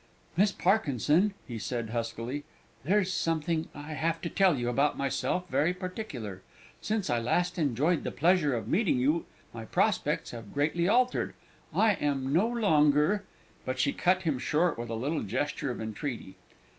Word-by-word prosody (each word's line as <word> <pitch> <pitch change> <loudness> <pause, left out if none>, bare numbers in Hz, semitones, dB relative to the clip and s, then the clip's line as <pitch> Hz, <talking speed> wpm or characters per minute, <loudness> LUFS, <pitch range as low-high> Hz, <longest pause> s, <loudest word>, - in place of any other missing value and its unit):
"Miss 200 +4 +4
Parkinson," 180 - +2
he 120 -4 -5
said 115 0 -3
huskily, 120 +4 -3 0.4
"there's 190 +4 +2
something 165 0 0
I 145 +2 -7
have 165 +2 -1
to 170 - -3
tell 190 -6 +4
you 120 -1 -2
about 140 +5 +1
myself, 160 +6 -1
very 170 +2 +1
particular. 145 - -6 0.4
Since 215 -2 -1
I 120 - +2
last 175 +9 0
enjoyed 150 +3 +1
the - - -2
pleasure 165 -4 +2
of 110 -3 -4
meeting 190 - +2
with 125 - 0
you 155 +5 +2 0.3
my 115 -1 -7
prospects - - 0
have 115 -1 -9
greatly 155 +4 +1
altered, 250 +4 +2 0.4
I 220 -1 +4
am 140 -5 -1
no 185 +8 +4
longer 185 -4 +3 0.2
" - - -31
But 130 0 -3
she 140 +2 +1
cut 185 +1 +2
him 155 -7 0
short 165 +6 +1
with 120 0 -6
a 115 - -2
little 140 +8 -1
gesture 130 +6 -2
of 125 - -4
entreaty. 110 -2 -5
150 Hz, 170 wpm, -29 LUFS, 125-180 Hz, 0.4 s, Miss